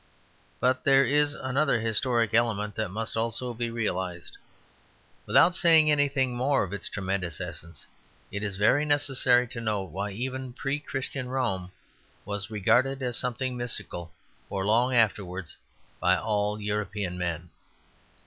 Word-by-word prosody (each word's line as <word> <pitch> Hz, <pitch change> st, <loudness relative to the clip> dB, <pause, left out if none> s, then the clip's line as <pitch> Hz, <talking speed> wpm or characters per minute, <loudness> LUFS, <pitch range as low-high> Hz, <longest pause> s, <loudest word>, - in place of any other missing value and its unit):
But 130 Hz, +1 st, +1 dB
there 135 Hz, 0 st, +5 dB
is 145 Hz, +2 st, +2 dB
another 135 Hz, -1 st, +1 dB
historic 115 Hz, 0 st, +1 dB
element 110 Hz, -3 st, +2 dB
that -, -, -2 dB
must 110 Hz, +4 st, -3 dB
also 115 Hz, +2 st, -1 dB
be 120 Hz, 0 st, -3 dB
realized. 95 Hz, -6 st, -3 dB, 0.9 s
Without 175 Hz, -, +5 dB
saying 160 Hz, -4 st, +5 dB
anything 140 Hz, -3 st, +1 dB
more 135 Hz, +1 st, +2 dB
of 95 Hz, 0 st, -6 dB
its 100 Hz, -, -3 dB
tremendous 95 Hz, -4 st, -3 dB
essence, 85 Hz, +1 st, -8 dB, 0.5 s
it 100 Hz, -, -4 dB
is 100 Hz, -2 st, -4 dB
very 110 Hz, +8 st, +3 dB
necessary 135 Hz, -4 st, +3 dB
to 115 Hz, -, -5 dB
note 105 Hz, -5 st, -2 dB
why 100 Hz, +4 st, -3 dB
even 130 Hz, +4 st, -5 dB
pre 135 Hz, +3 st, -2 dB
Christian 135 Hz, -2 st, -4 dB
Rome 95 Hz, -9 st, -2 dB, 0.5 s
was 100 Hz, -1 st, -4 dB
regarded 130 Hz, +6 st, +2 dB
as 125 Hz, -2 st, -1 dB
something 125 Hz, +1 st, -1 dB
mystical 100 Hz, -8 st, -4 dB, 0.4 s
for 95 Hz, -1 st, -2 dB
long 120 Hz, +5 st, +3 dB
afterwards 95 Hz, -6 st, 0 dB, 0.4 s
by -, -, +3 dB
all 105 Hz, -1 st, -1 dB
European 105 Hz, -3 st, -3 dB
men. 85 Hz, -1 st, -3 dB
115 Hz, 140 wpm, -27 LUFS, 100-130 Hz, 0.9 s, there